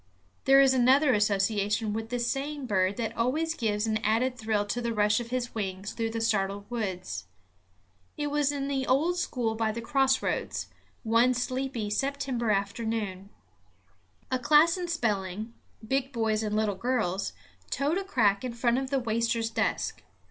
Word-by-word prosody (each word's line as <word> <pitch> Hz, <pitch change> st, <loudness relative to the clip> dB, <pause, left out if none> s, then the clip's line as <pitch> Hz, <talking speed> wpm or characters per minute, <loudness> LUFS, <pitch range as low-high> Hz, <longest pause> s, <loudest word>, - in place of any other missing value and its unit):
There 270 Hz, 0 st, +7 dB
is 270 Hz, -1 st, +6 dB
another 260 Hz, +2 st, +5 dB
association 210 Hz, +1 st, +1 dB
with 225 Hz, +1 st, -4 dB
this 245 Hz, 0 st, -1 dB
same 280 Hz, +2 st, -2 dB
bird 195 Hz, -3 st, +1 dB
that 230 Hz, -1 st, -3 dB
always 300 Hz, +8 st, 0 dB
gives 215 Hz, -6 st, -1 dB
an 220 Hz, -1 st, +1 dB
added 225 Hz, +4 st, +1 dB
thrill 220 Hz, -3 st, 0 dB
to 240 Hz, +4 st, -2 dB
the 235 Hz, -1 st, -2 dB
rush 210 Hz, +1 st, +3 dB
of 235 Hz, -1 st, -6 dB
his 245 Hz, -1 st, -2 dB
wings 195 Hz, 0 st, -4 dB
through 225 Hz, -1 st, -2 dB
the 225 Hz, 0 st, -3 dB
startled 200 Hz, -2 st, 0 dB
woods. 185 Hz, -, -4 dB, 0.9 s
It 295 Hz, -1 st, -2 dB
was 290 Hz, -1 st, +2 dB
in 280 Hz, -1 st, -3 dB
the 270 Hz, -2 st, -1 dB
old 315 Hz, +7 st, +2 dB
school 240 Hz, -9 st, -1 dB
by 220 Hz, 0 st, 0 dB
the 225 Hz, -, -5 dB
cross 265 Hz, +2 st, +2 dB
roads, -, -, -2 dB, 0.3 s
one 235 Hz, +2 st, +3 dB
sleepy 250 Hz, -3 st, -2 dB
September 270 Hz, -1 st, -1 dB
afternoon. 200 Hz, -1 st, -2 dB, 1.0 s
A 255 Hz, -, +1 dB
class 305 Hz, +6 st, +5 dB
in 360 Hz, -1 st, -4 dB
spelling, 215 Hz, -, -2 dB, 0.3 s
big 270 Hz, +2 st, 0 dB
boys 225 Hz, -3 st, 0 dB
and 210 Hz, -1 st, -2 dB
little 215 Hz, -1 st, +1 dB
girls, 200 Hz, -4 st, -1 dB, 0.4 s
toed 295 Hz, +6 st, 0 dB
a -, -, -4 dB
crack 215 Hz, -, +2 dB
in 250 Hz, -2 st, -3 dB
front 235 Hz, +1 st, +1 dB
of 265 Hz, -1 st, -4 dB
the 275 Hz, -, +1 dB
waster's 230 Hz, -1 st, 0 dB
desk. 220 Hz, -1 st, -1 dB
230 Hz, 165 wpm, -28 LUFS, 210-265 Hz, 1.0 s, There